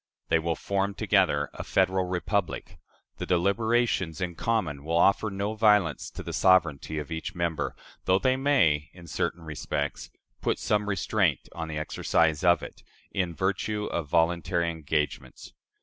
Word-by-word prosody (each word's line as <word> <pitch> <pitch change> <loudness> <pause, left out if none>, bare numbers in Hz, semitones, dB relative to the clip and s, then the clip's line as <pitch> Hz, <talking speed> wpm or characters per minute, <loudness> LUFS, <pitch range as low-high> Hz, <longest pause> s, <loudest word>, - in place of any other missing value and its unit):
They 80 - +4
will 85 0 -1
form 100 0 -1
together 95 -9 +2
a - - -6
federal 95 0 +1
republic: 90 -1 -2 0.4
the - - -5
deliberations 100 -1 +1
in 90 -1 -2
common 85 -8 -1
will 85 +2 0
offer 100 +5 +3
no 100 +2 -2
violence 105 - +3
to - - -8
the - - -6
sovereignty 80 -5 +3
of 75 0 -5
each 80 +5 -4
member, 85 -2 -2 0.3
though 95 - +4
they 130 +5 +2
may, 85 - +2
in 90 -1 -13
certain 85 +1 -2
respects, 75 -2 -4 0.3
put - - 0
some 105 0 0
restraint 100 -3 0
on 80 0 -5
the 80 -1 -5
exercise 80 0 +1
of 85 -2 +4
it, - - -9 0.3
in 90 -4 -2
virtue 100 +3 -1
of 85 -3 -2
voluntary 85 +1 +1
engagements. 75 -2 -3
85 Hz, 150 wpm, -27 LUFS, 80-100 Hz, 0.4 s, They